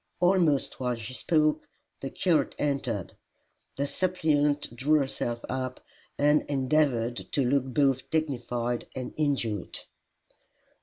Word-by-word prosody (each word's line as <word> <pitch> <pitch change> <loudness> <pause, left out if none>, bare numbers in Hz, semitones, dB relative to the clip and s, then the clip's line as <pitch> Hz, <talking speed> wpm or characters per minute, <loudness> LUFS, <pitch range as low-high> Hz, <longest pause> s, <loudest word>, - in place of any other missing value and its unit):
Almost 175 -6 +2
while 125 -1 0
she 115 +2 -7
spoke, 155 +2 +1 0.3
the 135 - -4
curate 170 0 +1
entered. 135 -9 -2 0.6
The 140 - 0
suppliant 150 -6 +1
drew 150 +6 +3
herself 120 -4 -2
up, 130 0 -3 0.4
and 150 +1 +4
endeavoured 130 -4 +1 0.2
to 140 - +2
look 135 0 +2
both 135 0 +1
dignified 120 -6 -1
and 130 -1 -5
injured. 125 - -1
140 Hz, 110 wpm, -28 LUFS, 125-150 Hz, 0.6 s, and